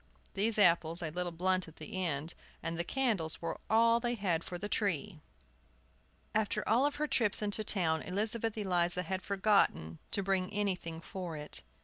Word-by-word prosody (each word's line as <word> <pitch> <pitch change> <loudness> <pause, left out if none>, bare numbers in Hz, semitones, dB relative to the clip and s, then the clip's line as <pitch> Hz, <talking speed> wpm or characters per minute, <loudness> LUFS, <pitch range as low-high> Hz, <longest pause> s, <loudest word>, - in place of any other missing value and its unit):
These 215 +2 +2
apples, 170 -3 +3
a 160 - -3
little 175 +1 -2
blunt 185 +2 0
at 160 - -13
the 185 +4 -5
end, 155 -1 -2 0.3
and 165 0 -2
the 170 - -1
candles 210 -9 +1
were 165 - -4
all 230 +1 +5
they 240 0 -1
had 180 -6 0
for 180 - -6
the 200 +4 -4
tree! 200 -4 -1 1.1
After 215 -1 0
all 250 +6 +4
her 295 +1 -2
trips 225 -8 +2
into 210 +1 -1
town 165 -6 +2
Elizabeth 220 +3 -1
Eliza 180 -3 +1
had 185 +2 -3
forgotten 190 - +1
to 200 - +1
bring 190 0 0
anything 185 -5 -2
for 175 -3 -6
it. 150 0 -2
185 Hz, 165 wpm, -33 LUFS, 170-210 Hz, 1.1 s, all